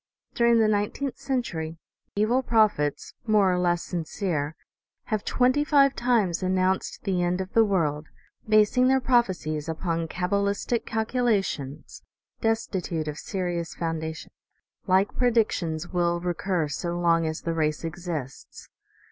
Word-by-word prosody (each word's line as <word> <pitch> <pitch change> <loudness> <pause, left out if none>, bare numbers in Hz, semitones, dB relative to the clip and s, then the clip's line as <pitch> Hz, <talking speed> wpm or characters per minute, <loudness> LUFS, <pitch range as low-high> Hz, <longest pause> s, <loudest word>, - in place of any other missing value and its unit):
During 235 0 +4
the 220 - +4
nineteenth 215 +6 -1
century, 170 - -3 0.4
evil 220 +5 +2
prophets, 215 - +1
more 205 -4 +4
or 180 - 0
less 175 -1 +1
sincere, 165 -3 -3 0.6
have 215 - 0
twenty 255 +3 +2
five 280 -2 +4
times 230 -8 +1
announced 185 0 0
the 190 -3 0
end 175 +1 0
of 190 +1 -5
the 225 - +6
world, 160 -7 0 0.4
basing 215 +4 +4
their 265 0 +4
prophecies 185 - 0
upon 165 0 -2
cabalistic 200 +6 -1
calcula 225 -1 +1
tions 140 0 -7 0.4
destitute 190 -8 -1
of 150 0 -4
serious 175 -4 -3
foundation. 160 -1 -4 0.6
Like 190 +2 +2
predictions 210 -9 +1
will 175 -1 +1
recur 175 -1 -1
so 170 +4 -3
long 165 -1 +3
as 155 0 -4
the 165 - -2
race 155 -1 -1
exists. 165 -5 -6
185 Hz, 130 wpm, -26 LUFS, 165-220 Hz, 0.6 s, the